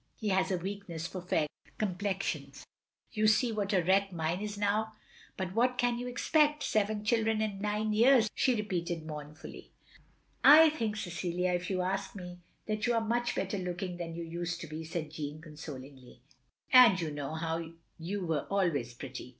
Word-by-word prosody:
He 215 - -3
has 190 0 +2
a 185 - +1
weakness 180 -3 -5
for 185 +1 -5
fair 165 -3 +1 0.3
complexions. 180 -8 -3 0.5
You 215 0 +2
see 230 +3 +3
what 205 -2 -1
a 185 -4 +3
wreck 195 +2 +3
mine 170 +2 -2
is 210 -1 -4
now. 210 +2 0 0.4
But 185 -1 -3
what 250 +3 +2
can 245 -1 +1
you 245 - -4
expect? 300 +4 +2
Seven 210 0 0
children 220 0 +2
in 210 -3 -2
nine 210 +1 0
years," 235 +1 +5
she 255 - +2
repeated 175 -6 -2
mournfully. 150 0 -9 0.4
" - - -38
I 320 -1 +8
think, 225 -8 -2
Cecilia, 180 -1 -2
if 180 0 -2
you 185 -2 0
ask 195 +2 -2
me, 180 -2 -8 0.3
that 215 +2 -1
you 240 - +2
are 230 - +2
much 240 +1 0
better 195 +1 -2
looking 180 0 -4
than 165 -2 -5
you 170 - -4
used 170 +1 -4
to 165 - -6
be," 155 +2 -6
said 160 -2 -4
Jeanne, 150 -1 -5
consolingly, 140 -5 -11 0.5
"and 245 -7 +8
you 160 -3 -2
know 160 +3 -3 0.3
you 185 +3 -3
were 160 -4 -1
always 165 -12 0
pretty. 125 +1 -8
185 Hz, 175 wpm, -31 LUFS, 165-215 Hz, 0.5 s, I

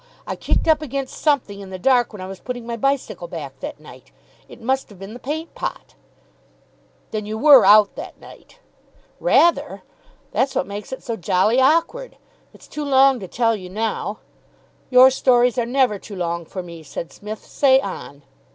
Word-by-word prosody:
I - - -4
kicked - - -1
up 315 -1 +4
against 275 -2 -5
something 270 -10 0
in 195 -1 -9
the 190 - -6
dark 245 +4 +2
when 205 -4 -9
I - - -6
was 190 0 -9
putting 245 -2 -6
my 235 0 -4
bicycle 275 - -2
back - - -8
that - - -7
night. - - -15 0.4
It - - -13
must 265 +3 -1
have 205 - -15
been 195 +3 -9
the 245 - -9
paint 315 +5 -5
pot." - - -6 1.2
"Then 210 -1 -4
you 215 +1 -4
were 280 0 +7
out 210 -1 +6
that - - -8
night?" - - -16 0.6
"Rather. 345 -8 +2 0.5
That's 270 +1 0
what - - 0
makes 205 +1 -8
it 260 - -7
so 235 -4 -3
jolly 200 +7 +2
awkward. 335 - +1 0.3
It's - - -18
too 300 - -6
long 270 -2 +4
to 190 - -8
tell 230 +3 +1
you 185 -3 -9
now 215 +1 -3 0.4
" - - -33 0.3
"Your 255 +1 +7
stories 250 -2 +3
are 235 - -1
never 250 -5 +1
too 205 - -10
long 170 -2 -3
for 185 +3 -7
me," 170 -2 -10
said 155 +2 -7
Psmith. 210 +1 -8
"Say 265 -2 +3
on!" 145 - -7
240 Hz, 190 wpm, -21 LUFS, 200-270 Hz, 1.2 s, were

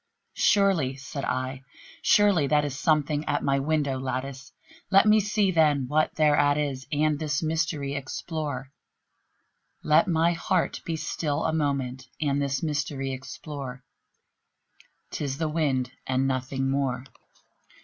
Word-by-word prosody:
"Surely," 190 -10 +3
said 140 +1 -6
I, 130 +1 -2 0.4
"surely 200 -8 +4
that 150 +1 +3
is 140 -2 -4
something 150 0 +1
at 145 - -1
my 140 0 +2
window 140 -2 0
lattice; 130 +1 -4 0.4
Let 195 +1 +6
me 215 0 +6
see, 210 -1 +1
then, 150 -6 +3
what 155 +3 +1
thereat 145 -2 +3
is, 140 -3 -2
and 150 0 +1
this 150 -1 -1
mystery 155 -3 -1
explore 140 -1 -4 1.1
Let 155 +5 +4
my 170 0 +3
heart 180 +1 -1
be 165 - -2
still 155 -1 -2
a 160 - +1
moment, 135 -4 -1
and 145 -2 0
this 140 0 -1
mystery 145 -3 -2
explore; 130 0 -7 1.3
'Tis 140 -2 -3
the 160 0 -1
wind 140 -5 0 0.2
and 130 +1 +1
nothing 130 0 -1
more." 135 -2 -1
145 Hz, 130 wpm, -26 LUFS, 135-155 Hz, 1.3 s, Let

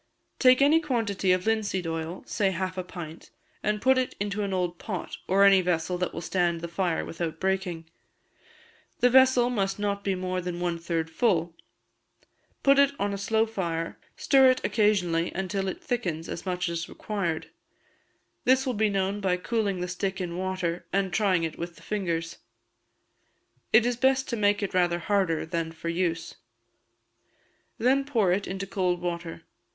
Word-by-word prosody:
Take 255 +1 +6
any 305 +3 +5
quantity 225 - 0
of 185 +1 +1
linseed 215 -5 0
oil, 165 +2 -4
say 200 -2 +1
half 185 0 -3
a 185 - -3
pint; 170 -3 -9 0.5
put 260 0 +4
it 255 - -2
into 205 +1 -2
an 200 -1 -2
old 180 -2 -1
pot, 190 -5 -5
or 195 +2 +4
any 195 -1 +7
vessel 180 0 0
that 180 - -1
will - - -6
stand 175 -2 0
the 170 - -4
fire 170 0 -1
without 165 -1 -4
breaking 190 -3 -1 1.1
the 250 0 +4
vessel 260 -1 +5
must 195 -4 -1
not 200 -1 -2
be 195 -1 0
more 185 0 -2
than 175 -1 -4
one 175 -1 -1
third 165 -1 -2
full; 170 -4 +1 1.1
put 275 0 +5
it 280 0 +5
on 200 0 0
a - - -3
slow 220 +2 +2
fire, 170 -7 -3 0.2
stir 270 -2 +5
it 255 - +1
occasionally 180 -6 +2
until 190 +1 -2
it 190 - -5
thickens 175 -10 -2
as 170 - -6
much 180 0 -1
as 170 0 -3
required; 190 -7 -3 0.9
this 260 +2 +3
will 255 - 0
be 215 -1 +2
known 195 0 -1
by 185 -2 +1
cooling 200 -2 -1
the 180 - -2
stick 190 +2 -3
in 175 -2 -4
water, 185 -2 -2
and 195 -1 0
trying 190 -5 +2
it 160 - -4
with 170 0 -5
the - - -17
fingers. 170 -5 -3 1.3
It 220 +1 +6
is 245 -1 0
best 265 +1 +2
to 240 - -1
make 205 -1 +2
it 200 - -3
rather 175 -1 +2
harder 185 -3 0
than 165 0 -3
for 165 +1 -6
use. 165 -1 -1 1.4
Then 265 +4 +3
pour 230 -10 +1
it 195 +3 0
into 190 +1 -4
cold 185 -2 0
water. 170 -2 -5
190 Hz, 170 wpm, -27 LUFS, 170-210 Hz, 1.4 s, any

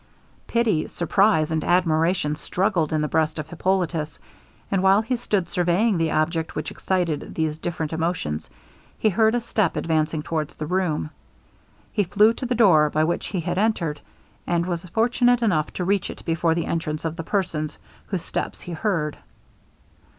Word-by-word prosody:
Pity, 225 -9 +1
surprize, 170 -2 +2
and 160 -1 0
admiration 165 -2 +2
struggled 180 -1 0
in 155 -1 +1
the 150 - 0
breast 155 +1 0
of 155 -2 -4
Hippolitus; 170 -3 -1 0.5
and 195 -2 +2
while 195 +3 +5
he 250 +3 -1
stood 205 -7 -1
surveying 180 +4 +1
the 165 -1 +1
object 160 +1 0
which 155 - -3
excited 175 -5 -2
these 155 -1 -1
different 160 -2 -3
emotions, 160 - -2 0.5
he 215 - +2
heard 220 +3 +3
a - - +2
step 225 -3 0
advancing 155 -1 0
towards 155 -2 -3
the 155 - -4
room. 160 -3 -1 0.8
He 210 - +2
flew 210 +4 +4
to 255 +2 -5
the 245 - 0
door 170 -10 +5
by 155 +1 +1
which 170 +2 -1
he 185 -4 -2
had 175 +2 -2
entered, 175 -9 0 0.5
and 170 -1 +1
was 175 -1 -3
fortunate 245 +4 +2
enough 160 -9 +1
to 180 - -3
reach 195 0 +1
it - - -9
before 165 0 +1
the 170 - -1
entrance 155 -1 -2
of 165 0 -2
the 165 - -5
persons 165 -5 -2 0.3
whose 190 -5 -2
steps - - -4
he 175 - -8
heard. 165 -4 -1
170 Hz, 170 wpm, -24 LUFS, 155-195 Hz, 0.8 s, while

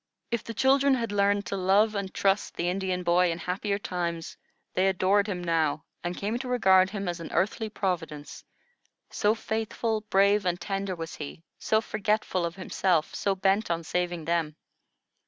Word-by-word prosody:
If 235 -2 -1
the 230 - -7
children 270 +1 +4
had 230 -4 -2
learned 200 0 +2
to - - -3
love 195 +3 +3
and 200 -2 -3
trust 195 +1 +1
the 175 - -1
Indian 185 -1 -1
boy 175 0 +3
in 165 - -3
happier 190 +4 -2
times, 170 -4 -4 0.4
they 185 +1 +2
adored 195 +2 +2
him 180 -4 -3
now, 160 -2 0 0.2
and 175 0 -3
came 215 +4 -2
to 260 - -5
regard 190 -7 +4
him 200 -1 -4
as 175 -1 -3
an 165 - -7
earthly 215 +6 0
Providence; 165 -8 -4 0.7
so 210 +2 +2
faithful, 220 0 -2
brave, 200 +1 +4
and 180 -1 0
tender 195 +1 -3
was 165 -1 -6
he, 155 +2 -8 0.2
so 220 0 +2
forgetful 210 -5 0
of 165 - -8
himself, 185 -3 0
so 200 -1 0
bent 195 +2 +1
on 170 -1 -1
saving 175 -1 -2
them. 165 -2 0
190 Hz, 175 wpm, -27 LUFS, 175-210 Hz, 0.7 s, children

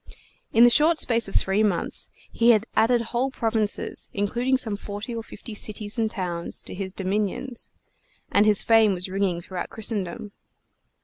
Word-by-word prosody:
In 230 - +5
the 240 - +7
short 310 +5 +5
space 230 -6 +2
of 195 - -9
three 195 +2 +2
months 200 -5 0 0.2
he 235 +1 +2
had 220 -2 +4
added 240 +1 +3
whole 250 +3 +1
provinces, 220 -4 0
including 240 +6 0
some 225 -5 0
forty 205 +3 -7
or 230 - -4
fifty 225 0 -10
cities 210 +1 -2
and 220 -1 +1
towns, 175 -5 -3
to - - -9
his 190 0 -5
dominions; 205 +6 -3 0.6
and 205 +1 +4
his 210 -1 +4
fame 225 -3 +4
was 180 +1 -5
ringing 190 -2 -1
throughout 180 -1 -6
Christendom. 210 -3 -3
215 Hz, 165 wpm, -24 LUFS, 195-230 Hz, 0.6 s, the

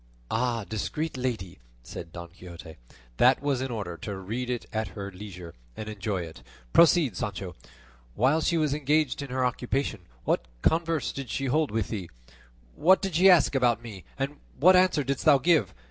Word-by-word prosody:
"Discreet 150 +9 -3
lady!" 120 -9 -4 0.2
said 80 - -8
Don 85 0 -8
Quixote; 85 -2 -12 0.4
"that 125 +1 +5
was 140 -3 -1
in 135 - -2
order 100 -8 -4
to 100 +2 -5
read 115 +7 -4
it 125 -2 -3
at 110 -1 -1
her 100 0 -5
leisure 90 -3 -9 0.2
and 110 - -6
enjoy 105 -2 -3
it; 80 -4 -10 0.3
proceed, 165 - +5
Sancho; 95 -5 -4 0.6
while 135 +8 +3
she 170 - +1
was 155 -3 +1
engaged 150 -1 +1
in 140 - -6
her 130 0 0
occupation 125 -3 -2 0.2
what 60 - 0 0.2
converse 165 -2 +1
did 135 -3 -7
she 135 - -2
hold 150 +3 +1
with 110 -1 -2
thee? 95 -7 -5 0.6
What 185 +4 +4
did 195 -3 -3
she 185 +5 +6
ask 175 -6 +5
about 120 -3 +2
me, 105 -6 -9
and 140 +1 -3 0.2
what 180 +8 +6
answer 180 -5 +4
didst 135 0 -2
thou 150 -3 +7
give? 160 +4 +2
125 Hz, 175 wpm, -27 LUFS, 100-150 Hz, 0.6 s, thou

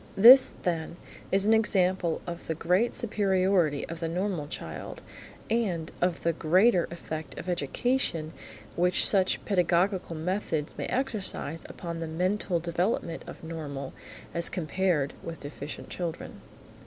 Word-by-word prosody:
This, 250 +6 +9
then, 170 -1 -2 0.3
is 195 +1 +3
an 220 - +5
example 185 -6 +2
of 175 -1 -7
the 160 - -1
great 180 +9 +1
superiority 190 -8 +2
of 165 0 -7
the 165 - -2
normal 175 -2 -2
child, 80 - -7 0.4
and 190 -8 -1
of 175 -1 0
the 170 - +2
greater 180 +4 +3
effect 160 -2 -7
of - - -7
education 170 - -1 0.4
which 180 +1 +3
such 190 -2 +2
pedagogical 180 -1 +1
methods 160 -2 -2
may - - -4
exercise 210 - -3
upon 170 -1 -6
the 165 - -4
mental 180 +2 0
development 170 0 -1
of - - -10
normal 145 -4 -6 0.4
as 170 0 +1
compared 170 -3 0
with 165 -1 -7
deficient 145 0 -8
children. 170 -3 -5
175 Hz, 130 wpm, -28 LUFS, 160-190 Hz, 0.4 s, This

